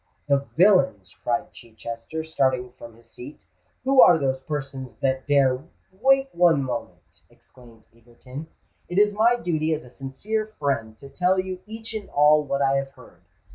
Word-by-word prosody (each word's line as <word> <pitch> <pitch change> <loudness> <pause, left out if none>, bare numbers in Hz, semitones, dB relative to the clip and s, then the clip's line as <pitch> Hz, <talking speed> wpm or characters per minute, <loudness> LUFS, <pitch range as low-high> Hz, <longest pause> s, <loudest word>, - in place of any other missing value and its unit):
"The 140 -1 +1
villains!" 180 - +3
cried 120 -1 -2
Chichester, 115 +6 -8
starting 130 -5 0
from 120 -2 -13
his 115 0 -21
seat: 125 - -12 0.4
"who 265 0 +5
are 175 - +7
those 135 -3 -1
persons 135 -3 -6
that 130 0 -1
dare——" 135 -2 +3 0.3
"Wait 270 +7 +2
one 170 -5 +4
moment!" 125 -2 -7
exclaimed 115 -3 -20
Egerton: 125 +6 -11 0.4
"it 175 - -4
is 210 0 +4
my 225 +4 +4
duty 160 -7 -1
as 155 - -9
a 125 - -15
sincere 200 - -4
friend 115 -7 -2
to 140 - -12
tell 180 +6 +1
you 185 -1 -4
each 225 +1 -8
and 215 -2 -6
all 150 +1 +4
what 140 -1 -1
I 135 0 +2
have 135 0 -4
heard. - - -18
140 Hz, 165 wpm, -24 LUFS, 125-180 Hz, 0.4 s, are